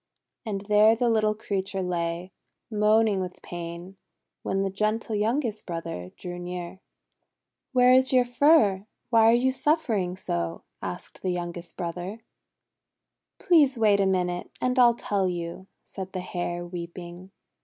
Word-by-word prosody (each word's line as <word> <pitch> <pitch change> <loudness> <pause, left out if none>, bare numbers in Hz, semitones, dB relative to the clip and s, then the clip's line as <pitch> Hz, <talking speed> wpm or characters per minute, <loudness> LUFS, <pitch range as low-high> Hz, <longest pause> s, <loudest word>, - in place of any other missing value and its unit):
And 200 -2 -2
there 210 +2 +5
the 235 0 +1
little 215 -1 +2
creature 195 -2 -3
lay, 175 0 -3 0.4
moaning 215 -1 +3
with 180 -1 -6
pain, 175 +2 -7 0.4
when 195 0 -1
the 195 - -1
gentle 215 +3 -1
youngest 220 +1 -1
brother 165 - -5
drew 175 0 -6
near. 175 +1 -6 0.9
'Where 250 -1 +5
is 260 0 +5
your 255 -1 +4
fur? 240 -7 +3 0.2
Why 225 -1 +6
are - - +6
you 255 +2 +2
suffering 230 - 0
so?" 85 - -3 0.2
asked - - -7
the 185 - -1
youngest 175 -1 -5
brother. 180 +5 -5 0.6
'' - - -60
Please 295 -8 +4
wait 210 -3 +4
a 195 - +3
minute, 180 -2 -1
and 255 +1 +1
I'll 240 -1 +6
tell 200 -5 0
you," 175 +1 -5 0.2
said 190 -1 -8
the 185 - -3
Hare, 175 -1 -4
weeping. 175 +1 -8
195 Hz, 145 wpm, -26 LUFS, 175-225 Hz, 0.9 s, Why